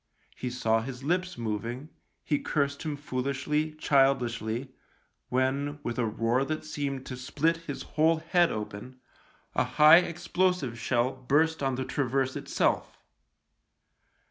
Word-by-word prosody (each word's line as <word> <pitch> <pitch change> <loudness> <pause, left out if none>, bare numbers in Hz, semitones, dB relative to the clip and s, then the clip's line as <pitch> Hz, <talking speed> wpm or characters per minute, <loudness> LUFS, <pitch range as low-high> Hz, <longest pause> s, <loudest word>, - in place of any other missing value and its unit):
He 125 - -4
saw 115 -2 +1
his 125 +2 -7
lips 180 +3 -1
moving, 115 +5 -4 0.3
he 145 -2 0
cursed 140 -2 -1
him 155 -2 -3
foolishly, 145 +3 -2
childishly, 130 -4 +1 0.6
when, 135 +3 0
with 120 0 -3
a 120 - +1
roar 115 +4 +1
that 155 +2 -3
seemed 140 -3 -3
to 130 - -6
split 150 +6 0
his 160 -4 -6
whole 160 +1 +2
head 170 +2 +2
open, 105 +4 -6 0.5
a - - +2
high 155 +2 +7
explosive 175 -6 0
shell 120 +2 +1
burst 145 +5 +1
on 135 -2 0
the 130 +1 -3
traverse 130 -1 0
itself. - - 0
135 Hz, 130 wpm, -28 LUFS, 125-155 Hz, 0.6 s, high